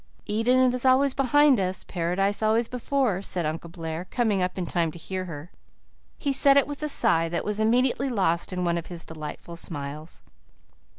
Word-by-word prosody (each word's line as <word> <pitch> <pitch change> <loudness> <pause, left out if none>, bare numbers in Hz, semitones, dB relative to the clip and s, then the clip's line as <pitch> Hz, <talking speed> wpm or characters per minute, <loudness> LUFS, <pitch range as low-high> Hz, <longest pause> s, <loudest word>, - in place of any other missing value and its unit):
"Eden 250 +4 +2
is 250 - -4
always 265 +1 +4
behind 280 -1 +4
us 185 0 -2
Paradise 195 +4 -1
always 220 +2 +2
before," 250 -5 -1
said 180 -3 -1
Uncle 160 +2 -4
Blair, 165 0 -6
coming 215 -2 0
up 180 +1 -2
in 180 - -2
time 165 -1 0
to 170 - -11
hear 185 +2 -5
her. 160 -1 -9 0.7
He 280 -2 -1
said 275 +1 +5
it 280 - +5
with 290 0 -7
a 300 - -1
sigh 165 - +2
that 170 - -3
was 210 0 -1
immediately 250 +4 +2
lost 185 -8 0
in 180 -1 -2
one 170 -1 0
of 165 - -9
his 175 -2 -6
delightful 160 +2 -8
smiles. 150 -1 -4
190 Hz, 185 wpm, -25 LUFS, 170-250 Hz, 0.7 s, said